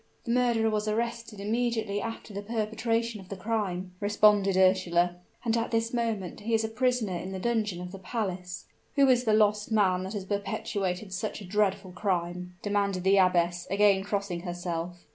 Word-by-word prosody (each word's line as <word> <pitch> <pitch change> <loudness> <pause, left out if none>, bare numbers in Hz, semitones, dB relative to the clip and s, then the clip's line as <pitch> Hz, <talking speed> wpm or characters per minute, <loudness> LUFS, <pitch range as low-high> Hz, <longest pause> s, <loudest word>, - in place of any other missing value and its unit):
"The 235 - -3
murderer 235 -2 +2
was 210 0 -1
arrested 230 0 -2
immediately 220 -1 -1
after 225 -1 -6
the 200 - -4
perpetration 225 +1 -1
of 185 - -15
the 195 - -4
crime," 190 -3 -2
responded 205 -2 +4
Ursula; 180 -2 +3 0.3
"and 225 -1 +2
at 230 0 0
this 225 +1 0
moment 225 -6 -2
he 225 +2 0
is 220 - +1
a 220 - -1
prisoner 245 -3 0
in 185 +2 -5
the - - -3
dungeon 215 -3 -1
of 180 0 -6
the 195 - -8
palace." 185 -3 -4 0.3
"Who 280 -1 +5
is 250 -1 +4
the 220 - +3
lost 210 +1 +2
man 190 -4 +3
that 190 - -5
has 200 -3 -4
perpetrated 195 -1 -2
such 215 +4 -3
a 205 - -9
dreadful 195 0 0
crime?" 180 -1 -2
demanded 200 -3 0
the 195 +1 +4
abbess, 175 -2 +2
again 200 0 +4
crossing 200 -3 -2
herself. 175 -1 -5
205 Hz, 180 wpm, -28 LUFS, 185-225 Hz, 0.3 s, Who